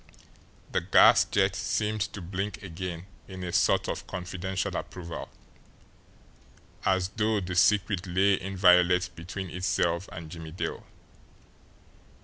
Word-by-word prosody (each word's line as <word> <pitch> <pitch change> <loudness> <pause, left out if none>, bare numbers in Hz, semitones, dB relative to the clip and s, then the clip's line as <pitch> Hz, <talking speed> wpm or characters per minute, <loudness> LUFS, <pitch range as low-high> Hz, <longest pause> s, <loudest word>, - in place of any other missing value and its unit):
The - - +1
gas - - +6
jet - - +1
seemed 105 0 -1
to 100 - -7
blink 100 +4 -4
again 90 -1 -6 0.2
in 95 -1 -8
a 90 -1 -4
sort - - +3
of - - -4
confidential 95 +1 -4
approval, 85 -2 -6 1.5
as 95 -1 +1
though 110 +1 0
the 90 -1 -5
secret 100 0 +2
lay 95 +2 +2
inviolate 90 -1 +4
between 90 +2 -6
itself 90 0 0
and 80 -1 -8
Jimmie 80 -2 -8
Dale. 90 - -4
90 Hz, 120 wpm, -28 LUFS, 90-95 Hz, 1.5 s, gas